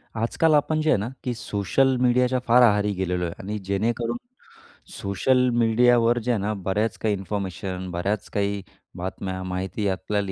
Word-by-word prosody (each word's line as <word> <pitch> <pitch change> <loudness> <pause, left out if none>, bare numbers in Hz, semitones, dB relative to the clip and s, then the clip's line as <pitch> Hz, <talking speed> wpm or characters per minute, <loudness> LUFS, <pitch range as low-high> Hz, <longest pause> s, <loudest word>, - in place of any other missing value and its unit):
आजकाल 135 +8 +2
आपण 155 +1 +2
जे 155 - +1
आहे - - +4
ना, 105 +4 -3
की 125 - -1
सोशल 115 +5 +1
मीडियाच्या 125 +1 +3
फार 120 +2 +6
आहारी 105 -3 +4
गेलेलो 90 -1 -2
आहे 85 - -4
आणि 105 +3 -4
जेणेकरून 115 +4 -1 0.7
सोशल 125 +6 +1
मीडियावर 120 +1 +4
जे 120 +2 -1
आहे 115 - +1
ना, 105 +2 -1
बऱ्याच 100 +3 -1
काही 110 -2 0
इन्फॉर्मेशन, 95 -1 -4
बऱ्याच 95 +4 -2
काही 100 0 -1 0.4
बातम्या 95 +1 -4
माहिती 95 +2 -3
आपल्याला 100 +1 -2
105 Hz, 155 wpm, -24 LUFS, 95-120 Hz, 0.7 s, फार